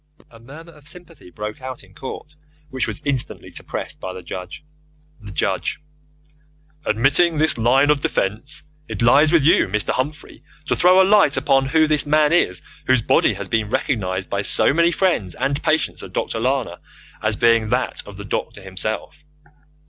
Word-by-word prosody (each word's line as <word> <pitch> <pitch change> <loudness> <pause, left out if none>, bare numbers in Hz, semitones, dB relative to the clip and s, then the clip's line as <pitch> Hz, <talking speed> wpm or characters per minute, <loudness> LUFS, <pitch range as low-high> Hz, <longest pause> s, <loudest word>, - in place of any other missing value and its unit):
A 115 - -15
murmur 150 +8 -13
of 150 -1 -15
sympathy 170 - -2
broke 105 +4 -7
out 130 -3 -7
in 95 -1 -20
court, 150 +6 -9 0.4
which 130 -1 -2
was 110 -2 -4
instantly 135 -4 -2
suppressed - - -6
by 95 - -5
the 95 -1 -9
Judge. 90 - -8 0.6
The 105 -2 -10
Judge: 85 - -1 1.1
Admitting 140 +9 +2
this 155 +1 +2
line 130 +5 +3
of 145 -2 +1
defence, 110 +9 -3 0.2
it - - -4
lies 145 +6 +5
with 165 -4 +4
you, 165 - +4
Mr. 105 +2 -1
Humphrey, 150 +4 -4 0.2
to - - 0
throw 185 +2 +5
a - - +3
light 200 -9 +4
upon 135 0 +2
who 155 +3 +3
this 150 -1 +1
man 150 +1 +3
is 90 - +1 0.2
whose 130 -3 +3
body - - +2
has - - -5
been 110 -2 -1
recognized 100 -8 -2
by 100 - -2
so 105 - +4
many 170 +2 +3
friends 160 - 0
and 140 +2 -1
patients 160 0 0
of - - -11
Dr. 115 - -2
Lana 125 -7 -1 0.4
as 110 -1 0
being 115 -1 +3
that 125 +2 -1
of 100 -2 -11
the 100 - -8
doctor 100 0 -4
himself. 95 +3 -4
130 Hz, 175 wpm, -20 LUFS, 105-150 Hz, 1.1 s, lies